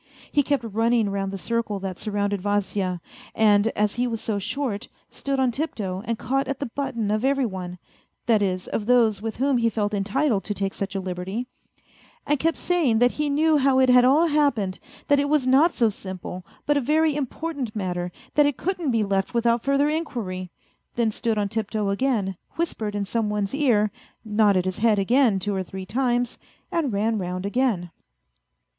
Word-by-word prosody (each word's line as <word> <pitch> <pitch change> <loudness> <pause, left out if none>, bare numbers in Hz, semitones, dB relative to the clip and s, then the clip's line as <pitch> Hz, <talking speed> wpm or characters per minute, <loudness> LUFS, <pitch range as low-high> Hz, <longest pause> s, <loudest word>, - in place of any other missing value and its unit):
He 290 - +4
kept 285 -2 0
running 225 -1 +1
round 195 -1 -2
the 195 - -4
circle 225 0 -2
that 190 -2 -5
surrounded 205 -2 -1
Vasya, 195 -3 -1 0.3
and 210 -1 +4
as 210 -1 +1
he 245 +1 +1
was 230 -2 -3
so 215 -2 -2
short, 240 0 -3 0.2
stood 275 -1 -2
on 260 -2 +3
tiptoe 215 -9 -3
and 230 -1 -1
caught 270 +4 -1
at 275 -1 -3
the 280 - -2
button 235 -4 -2
of 215 +2 0
every 275 0 +2
one 180 -4 -5 0.5
that 225 -3 +3
is, 185 -2 -1
of 210 - -3
those 230 -5 +4
with 225 -1 -4
whom 265 0 +2
he 230 0 +3
felt 210 -1 -1
entitled 210 +3 +1
to 205 - -3
take 195 -1 -2
such 195 0 -4
a - - 0
liberty 190 +5 -4 0.8
and 295 -1 +1
kept 330 +2 +1
saying 325 -11 +1
that 245 +2 +4
he 300 -1 -1
knew 305 +2 +3
how 270 -1 +3
it 260 -1 +4
had 250 0 +7
all 280 +6 +5
happened, 280 - +1 0.3
that 285 -1 +4
it 285 0 0
was 300 -3 +2
not 275 +7 +5
so 235 - +2
simple, 185 -3 -6 0.2
but 295 - +2
a - - +2
very 305 +3 +2
important 285 -3 -4
matter, 180 -3 -2 0.2
that 295 -1 +5
it 290 - -1
couldn't 360 -4 -2
be 230 -3 +2
left 195 +3 -1
without 235 0 +2
further 275 +2 +2
inquiry; 230 - -3 0.5
then 230 -2 +1
stood 225 0 -1
on 205 -1 +1
tiptoe 215 -1 -2
again, 200 -4 0 0.2
whispered 220 -11 -2
in 205 -1 -1
some 220 +1 -1
one's 205 0 -2
ear, 235 -8 +2 0.3
nodded 210 -4 +3
his 185 -1 -3
head 220 -1 +3
again 230 +2 +3
two 205 +2 -2
or 190 - -1
three 190 +1 -7
times, 245 +2 0 0.3
and 315 -7 0
ran 215 +2 0
round 180 0 -4
again. 200 -6 0
225 Hz, 190 wpm, -24 LUFS, 200-270 Hz, 0.8 s, had